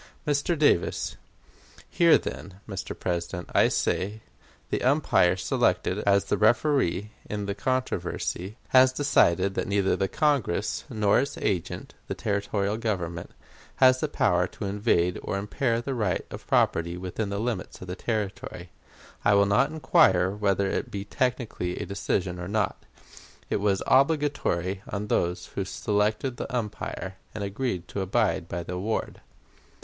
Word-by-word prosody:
Mr. 150 +3 +1
Davis: 145 - +2 0.7
Here, 170 -1 +5
then, 95 -1 -7
Mr. 95 -4 -6
President, 90 0 -3
I - - +5
say 105 +3 -1 0.5
the - - 0
umpire 130 - +3
selected - - +1
as 100 0 +4
the - - 0
referee 110 - +2 0.2
in 105 -1 -3
the 100 - -2
controversy 105 -3 -2
has 130 0 +6
decided 100 -9 +3
that - - -2
neither 100 -1 +2
the 95 - 0
Congress 140 - 0
nor 105 -2 +3
its 140 +2 -2
agent, 95 -5 -2
the - - -3
territorial 100 0 -1
government, 85 -7 -3 0.5
has 130 -1 +5
the 155 - 0
power 90 -10 +2
to 95 - -7
invade 100 -3 +1
or - - -3
impair 115 +4 -1
the 135 - -2
right 105 -8 -1
of - - -9
property 85 +1 +2
within 95 +3 -3
the 100 - -2
limits 110 -3 -3
of 90 - -9
a 90 - -4
Territory. 100 -5 -4 0.5
I 100 0 +5
will 100 0 +5
not 105 +8 +3
inquire 95 - +4
whether 100 -1 +1
it - - -2
be 100 0 -5
technically 115 -7 -2
a - - -3
decision 95 -2 -2
or 90 - -5
not. 105 0 -2 0.6
It - - +2
was 100 -1 +1
obligatory 135 - +2
on 105 +1 -4
those 90 +1 0
who 100 - -1
selected 105 +6 -1
the - - -5
umpire 105 -5 -4 0.2
and 105 - -3
agreed 100 -3 -3
to 100 - -3
abide 95 -3 +1
by 85 0 -3
the 90 - -6
award. 100 +5 -3
100 Hz, 150 wpm, -27 LUFS, 90-120 Hz, 0.7 s, has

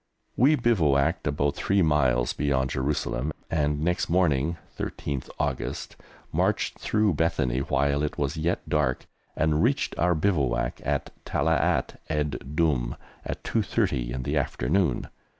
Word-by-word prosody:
We 140 +6 +5
bivouacked 80 - +2
about 70 0 0
three 95 +3 +2
miles 65 -6 +2
beyond 65 -3 0
Jerusalem, 70 0 -1 0.2
and 75 -2 +1
next 90 +2 0
morning 85 -3 +2 0.2
(13th 70 -3 -4
August) 75 -4 -3 0.4
marched - - 0
through 105 -3 +2
Bethany 75 -6 +1
while 70 +1 +1
it 75 - -2
was 70 +2 -1
yet 80 +2 -1
dark, 70 -4 0 0.3
and 80 -1 +2
reached 135 +5 +1
our 90 0 +3
bivouac 75 -9 0
at - - -1
Talaat - - +1
ed 75 -2 -1
Dumm 70 -8 +1 0.3
at - - -5
2.30 - - 0
in 65 +1 -3
the 70 +4 -1
afternoon. 75 +6 0
75 Hz, 130 wpm, -26 LUFS, 65-85 Hz, 0.4 s, We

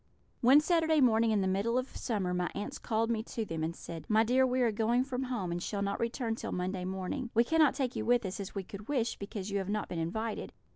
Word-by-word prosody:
"One 265 +5 +7
Saturday 320 -1 +3
morning 230 -3 +4
in 215 -2 +2
the 190 - +1
middle 200 +6 +1
of 255 +1 -3
summer 200 -7 -1
my 180 0 0
aunts 205 - -4
called 225 0 0
me 220 -2 0
to 225 - -3
them 165 -4 -3
and 165 +1 -2
said, 165 -2 -8
'My 220 0 +5
dear, 255 +3 +3
we 255 0 +1
are 235 -2 +3
going 230 +4 +2
from 260 -1 -3
home, 220 -9 -2
and 175 0 -2
shall 200 +2 -2
not 200 0 -2
return 235 0 -1
till 225 - -5
Monday 180 0 -2
morning. 190 +8 -3
We 230 - +6
cannot 310 +2 +3
take 260 -3 -1
you - - -2
with 240 0 +2
us, 190 +1 -4
as 195 0 -6
we 195 - -2
could 200 +3 -10
wish, 245 -5 -1
because 200 0 -5
you 200 - 0
have 190 0 -4
not 210 +1 -2
been 170 - -3
invited. 220 +7 -3
220 Hz, 255 wpm, -31 LUFS, 195-250 Hz, -, One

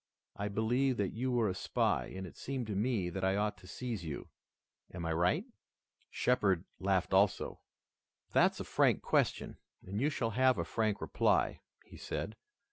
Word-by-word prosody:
I 100 - -2
believed 120 +5 +1
that 100 -2 -1
you 125 +3 -1
were 120 -3 +2
a 95 - 0
spy, - - 0
and 95 0 -6
it 90 - -10
seemed 130 -2 -4
to 105 -2 -3
me 105 -4 0
that 95 +2 -4
I 95 +1 +2
ought 105 +1 0
to 90 - -14
seize 115 -2 -4
you. 80 -3 -6 0.6
Am 85 -1 -5
I 80 - 0
right?" 90 - +2 0.6
Shepard 100 -8 +2 0.2
laughed 95 -1 +1
also. 95 +1 +2 0.7
"That's - - +4
a - - -2
frank - - +2
question - - +1 0.3
and 100 +4 -3
you 145 - +3
shall 115 -6 -1
have 130 +3 +4
a - - -1
frank 110 -3 0
reply," - - +1 0.2
he - - -13
said. - - -4
105 Hz, 175 wpm, -33 LUFS, 95-125 Hz, 0.7 s, That's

